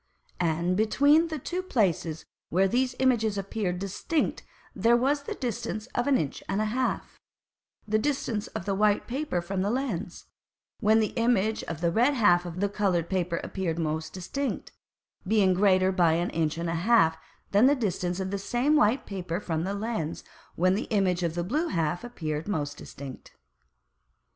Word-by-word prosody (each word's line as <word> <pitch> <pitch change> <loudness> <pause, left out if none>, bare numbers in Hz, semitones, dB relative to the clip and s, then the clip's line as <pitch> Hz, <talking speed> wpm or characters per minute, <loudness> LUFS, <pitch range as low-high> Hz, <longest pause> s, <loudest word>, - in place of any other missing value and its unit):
And 170 +1 +1
between 285 - +4
the 315 -1 -4
two 355 +6 -3
Places 175 - 0 0.2
where 190 +3 +3
these 250 +4 0
Images 230 -5 +2
appeared 195 -2 -2
distinct 200 - -1 0.3
there 230 +4 +4
was 280 +4 +1
the 285 - -5
distance 230 -3 -3
of 240 - 0
an 280 -2 +4
Inch 145 - -3
and 195 - 0
a 215 - +1
half; 250 +4 -2 0.7
the 215 0 +2
distance 245 -5 -1
of - - -6
the 200 - 0
white 205 +1 +2
Paper 260 - -2
from 190 +2 -2
the 200 - 0
Lens, 230 -9 -3 0.5
when 220 0 +4
the 215 - -1
Image 220 -2 +2
of 165 -1 -6
the 170 -1 +2
red 245 +9 +3
half 175 -7 +4
of 175 +2 -6
the 205 - +3
coloured 195 -5 0
Paper 180 -2 0
appeared 175 -4 -3
most 160 -1 -2
distinct, 265 +10 -4 0.6
being 200 -3 +4
greater 185 0 +4
by 175 -4 +3
an 170 +2 0
Inch 160 -1 -1
and 170 0 -2
an 165 0 -1
half 170 -4 +4 0.4
than 205 +6 +6
the 285 - +5
distance 180 -6 -2
of 190 0 -3
the 200 - -2
same 245 +9 +1
white 255 -2 +3
Paper 180 -3 -4
from 165 -4 -2
the 195 +1 -2
Lens, 200 -7 -3 0.3
when 185 +2 +3
the 205 - -1
Image 190 -4 +1
of 170 -2 -1
the 175 - -1
blue 300 - 0
half 165 - -1
appeared 160 -10 -4
most 145 -7 -2
distinct. 140 -3 -10
195 Hz, 175 wpm, -27 LUFS, 175-235 Hz, 0.7 s, than